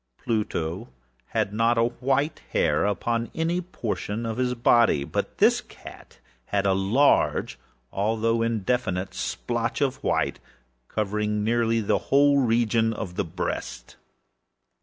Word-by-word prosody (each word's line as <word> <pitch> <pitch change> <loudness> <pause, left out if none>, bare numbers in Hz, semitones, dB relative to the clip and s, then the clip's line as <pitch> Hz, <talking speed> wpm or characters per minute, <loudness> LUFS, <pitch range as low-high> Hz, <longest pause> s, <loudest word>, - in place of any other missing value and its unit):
Pluto 105 -4 -2 0.4
had 110 -3 -1
not 115 +2 +2
a 115 - +4
white 135 +5 0
hair 75 +6 +2
upon 115 +3 -1
any 170 +2 0
portion 115 - -4
of 115 0 -3
his 125 -1 0
body; 115 - +4
but - - -4
this - - +4
cat - - -14 0.3
had 100 +5 -1
a 95 - +3
large, 100 +10 +2 0.3
although 115 +3 +1
indefinite 110 -4 -1
splotch - - -2
of - - -1
white, - - 0 0.5
covering 105 0 -1
nearly 115 0 +1
the 105 - +1
whole 140 +1 +5
region 115 -2 +2
of 95 -4 -6
the 90 - -1
breast. 80 -8 -5
115 Hz, 125 wpm, -25 LUFS, 100-120 Hz, 0.5 s, whole